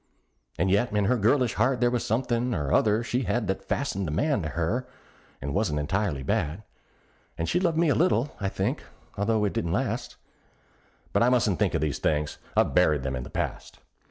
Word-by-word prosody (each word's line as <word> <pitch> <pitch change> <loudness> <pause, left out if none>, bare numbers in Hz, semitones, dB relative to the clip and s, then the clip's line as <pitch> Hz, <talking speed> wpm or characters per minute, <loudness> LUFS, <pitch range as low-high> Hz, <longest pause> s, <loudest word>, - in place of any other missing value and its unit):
And 95 +2 +1
yet 100 +5 +2
in 105 -1 +1
her 125 - +3
girlish 120 +2 +2
heart 130 -2 +1
there 120 0 +3
was 120 -1 0
somethin' 120 +1 0
or 75 -3 -1
other 110 +2 +3
she 120 +2 -1
had 120 -2 0
That 95 0 -2
fastened 100 -9 -2
a - - -3
man 140 - +1
to 75 - -3
her, 100 - -1 0.5
and 70 +1 -4
wasn't 100 -7 0
entirely 80 -1 -1
bad; 75 +8 -1 0.7
And 85 - -2
she 175 - +1
loved 170 -3 +1
me 165 -1 +3
a - - +4
little, 150 -6 +1
I 100 - -1
think, - - -2 0.3
although 105 +1 +1
it 100 - -1
didn't 85 0 -1
last; - - -2 1.0
But - - +3
I 120 - +5
mustn't 115 -7 +2
think - - +1
of - - 0
these 75 -2 -1
things 75 0 -1 0.2
I've - - +3
buried 75 -3 +3
'em 65 -1 -1
in 65 - -4
the - - -8
past. - - -4
105 Hz, 205 wpm, -27 LUFS, 80-125 Hz, 1.0 s, I